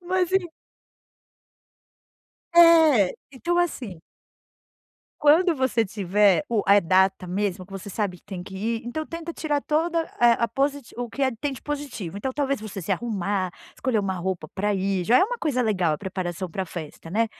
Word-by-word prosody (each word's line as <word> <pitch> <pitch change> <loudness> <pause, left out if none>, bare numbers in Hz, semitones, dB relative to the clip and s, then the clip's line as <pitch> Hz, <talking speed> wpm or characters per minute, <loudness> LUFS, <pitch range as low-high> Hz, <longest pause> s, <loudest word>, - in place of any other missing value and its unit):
Mas 365 0 0
em 380 -2 +2 2.1
É! 320 - +6 0.2
Então 345 +7 -1
assim 245 - -2 1.2
quando 325 +4 +5
você 260 -3 +1
tiver 200 +3 +2
o 225 -3 +1
a 200 +1 +6
data 190 0 +2
mesmo 185 0 -2
que 195 - -16
você 195 +1 -7
sabe 195 -3 -2
que - - -30
tem 195 -3 -7
que 190 +2 -9
ir, 225 +3 -2
então 310 +6 -3
tenta 335 +1 -6
tirar 295 -3 -1
toda, 330 +3 0 0.2
eh, 240 -1 +6
a 235 - +2
posit 275 +3 -2
o 245 0 -4
que, 280 - -4
eh, 260 - +2
tem 290 -1 -1
de 260 - -9
positivo. 280 - -5
Então 260 +6 -3
talvez 275 -4 -1
você 205 -3 -6
se 165 - -1
arrumar, 200 -4 -1 0.2
escolher 255 -5 0
uma 195 -2 -1
roupa 180 -2 -3
pra 205 +2 0
ir 195 -1 0
já 245 +6 +5
é - - +5
uma - - -3
coisa 290 - -1
legal, 185 -8 +1
a 150 - -7
preparação 185 -1 -4
pra 190 +3 -3
festa, 165 -1 -8
né. 225 +4 +2
225 Hz, 180 wpm, -24 LUFS, 190-290 Hz, 2.1 s, É